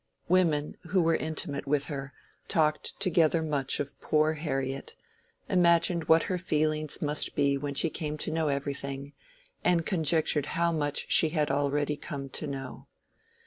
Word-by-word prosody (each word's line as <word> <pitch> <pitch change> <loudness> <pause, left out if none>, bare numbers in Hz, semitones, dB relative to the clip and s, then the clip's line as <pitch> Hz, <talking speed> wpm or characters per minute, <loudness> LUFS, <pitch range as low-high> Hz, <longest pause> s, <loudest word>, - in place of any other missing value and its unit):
Women, 160 -5 +1
who 180 0 +2
were 165 0 +3
intimate 155 -3 -2
with 145 0 +1
her, 140 -2 -5 0.4
talked 155 -1 0
together 165 -3 +3
much 145 -4 0
of 145 0 -5
"poor 155 0 +2
Harriet," 135 -3 -3 0.5
imagined 170 -2 +3
what 160 +1 +5
her 180 -1 -2
feelings 155 -3 0
must 150 0 0
be 140 -1 +2
when 140 0 -4
she 165 +3 +3
came 150 -1 -4
to - - -3
know 160 -1 0
everything, 140 0 -3 0.5
and 170 -2 +2
conjectured 160 -4 +1
how 170 0 +2
much 145 -3 -1
she 160 - +5
had 150 -3 0
already 145 +1 0
come 140 -4 -6
to 150 +3 -2
know. 135 -2 -7
150 Hz, 150 wpm, -28 LUFS, 140-165 Hz, 0.5 s, what